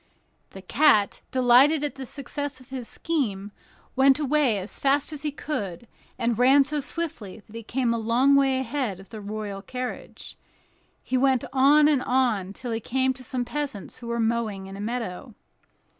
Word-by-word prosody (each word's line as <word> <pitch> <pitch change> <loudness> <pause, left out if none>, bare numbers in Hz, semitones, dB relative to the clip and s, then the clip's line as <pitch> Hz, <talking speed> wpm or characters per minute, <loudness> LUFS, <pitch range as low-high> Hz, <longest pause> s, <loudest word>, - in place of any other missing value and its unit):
The 190 - -11
cat, 215 -3 +3
delighted 260 +4 +5
at 295 - -2
the 265 -2 -8
success 285 0 -5
of 255 +1 -19
his 255 -3 -5
scheme, 210 -12 -2 0.4
went 270 0 +5
away 290 -6 +2
as 195 +1 -7
fast 280 +2 +1
as 295 - -7
he 300 - -1
could, 235 - -5 0.3
and 235 -1 0
ran 270 +3 +6
so 295 +2 -2
swiftly 265 - -5
that 215 - -16
he 230 - -5
kept 250 +4 -2
a - - -1
long 240 +5 +3
way 270 -1 +3
ahead 260 -6 -2
of 195 - -14
the 220 -2 -8
royal 205 -1 -5
carriage. 250 +4 -7 0.6
He 255 - -1
went 260 -1 +2
on 285 +3 +6
and 290 -4 +3
on, 240 -8 +1
till 245 +3 -6
he 225 - -1
came 260 +3 0
to 255 0 -13
some 250 0 -3
peasants 245 -5 -5
who 240 - -9
were 235 0 -2
mowing 225 -4 -1
in 195 0 -9
a 200 - -7
meadow. 225 0 -5
255 Hz, 180 wpm, -25 LUFS, 220-275 Hz, 0.6 s, ran